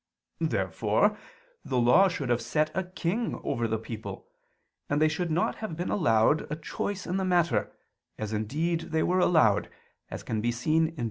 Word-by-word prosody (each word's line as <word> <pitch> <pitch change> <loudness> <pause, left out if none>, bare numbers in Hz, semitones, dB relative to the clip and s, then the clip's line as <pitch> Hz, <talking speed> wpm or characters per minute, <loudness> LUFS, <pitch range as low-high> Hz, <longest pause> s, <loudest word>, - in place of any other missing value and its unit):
Therefore - - +1 0.5
the 130 - -2
Law 125 +12 +6
should 145 -8 -3
have 120 0 +2
set 150 +6 0
a 190 - 0
king 185 +5 -2
over 115 0 -1
the 110 0 0
people, 110 0 -7 0.6
and 145 - +1
they 155 - +5
should 165 +3 -2
not 165 +3 0
have 215 -8 -5
been 175 - -2
allowed 150 - +2
a - - 0
choice 190 +4 -4
in 180 - -1
the 190 - 0
matter, 170 - +1 0.5
as 110 0 -4
indeed 150 +11 -1
they 160 0 +1
were 185 +1 +2
allowed 150 - +3 0.4
(Deut. 120 +9 0
155 Hz, 155 wpm, -28 LUFS, 120-175 Hz, 0.6 s, Law